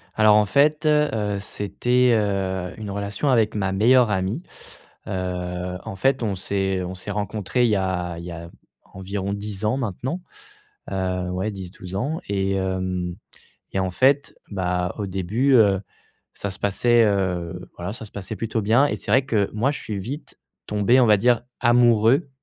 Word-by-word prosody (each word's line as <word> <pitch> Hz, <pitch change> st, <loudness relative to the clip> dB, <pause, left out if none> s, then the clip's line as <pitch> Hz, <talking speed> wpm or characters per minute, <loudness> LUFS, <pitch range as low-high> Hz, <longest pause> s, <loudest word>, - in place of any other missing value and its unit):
Alors 110 Hz, -1 st, +6 dB
en 105 Hz, 0 st, +5 dB
fait, 150 Hz, +6 st, +2 dB
heu, 115 Hz, -10 st, +2 dB
c'était, 120 Hz, +6 st, +1 dB
heu, 95 Hz, -4 st, -1 dB
une 105 Hz, -2 st, -6 dB
relation 100 Hz, +7 st, -2 dB
avec 115 Hz, -5 st, +3 dB
ma 95 Hz, -2 st, 0 dB
meilleure 120 Hz, +4 st, +4 dB
amie. 95 Hz, -, -1 dB, 0.7 s
Heu, 90 Hz, -1 st, -3 dB
en 95 Hz, -, -6 dB
fait, 135 Hz, +4 st, +2 dB
on 100 Hz, -3 st, -1 dB
s'est 95 Hz, 0 st, -1 dB
on 90 Hz, +1 st, -5 dB
s'est 95 Hz, +3 st, -6 dB
rencontrés, 105 Hz, +4 st, -1 dB
il -, -, +3 dB
y -, -, +3 dB
a 90 Hz, -3 st, -2 dB
il 85 Hz, -, -8 dB
y 90 Hz, -, -6 dB
a 85 Hz, 0 st, -8 dB, 0.4 s
environ 95 Hz, +1 st, -4 dB
10 105 Hz, 0 st, -5 dB
ans 110 Hz, +5 st, +1 dB
maintenant, 130 Hz, -, -3 dB, 0.7 s
heu, 90 Hz, -1 st, -1 dB
ouais, 95 Hz, +4 st, -2 dB
10-12 95 Hz, -1 st, -8 dB
ans 145 Hz, +10 st, -1 dB
et 95 Hz, -1 st, 0 dB
hem 95 Hz, -2 st, -2 dB, 0.6 s
et -, -, +1 dB
en 95 Hz, -1 st, -1 dB
fait, 135 Hz, +8 st, +2 dB
bah, 90 Hz, -2 st, -1 dB
au 100 Hz, -, -2 dB
début, 105 Hz, +9 st, +1 dB
heu, 100 Hz, -5 st, +5 dB, 0.5 s
ça 100 Hz, -, -4 dB
se 95 Hz, -, -8 dB
passait, 115 Hz, +3 st, +3 dB
heu, 90 Hz, -3 st, -1 dB
voilà, 90 Hz, +3 st, -4 dB
ça 115 Hz, -, -8 dB
se -, -, -12 dB
passait 100 Hz, +2 st, -6 dB
plutôt 115 Hz, 0 st, -2 dB
bien 115 Hz, +7 st, +4 dB
et 110 Hz, -, -2 dB
c'est 100 Hz, -, -7 dB
vrai 130 Hz, +3 st, +4 dB
que 105 Hz, -5 st, +1 dB
moi 120 Hz, +6 st, +2 dB
je -, -, -6 dB
suis 105 Hz, -2 st, -4 dB
vite 135 Hz, +10 st, -7 dB, 0.3 s
tombé, 105 Hz, +5 st, +3 dB
on 120 Hz, -, +5 dB
va 105 Hz, -, +6 dB
dire, 120 Hz, +2 st, +3 dB, 0.2 s
amoureux, 120 Hz, +3 st, +4 dB
100 Hz, 175 wpm, -23 LUFS, 95-120 Hz, 0.7 s, Alors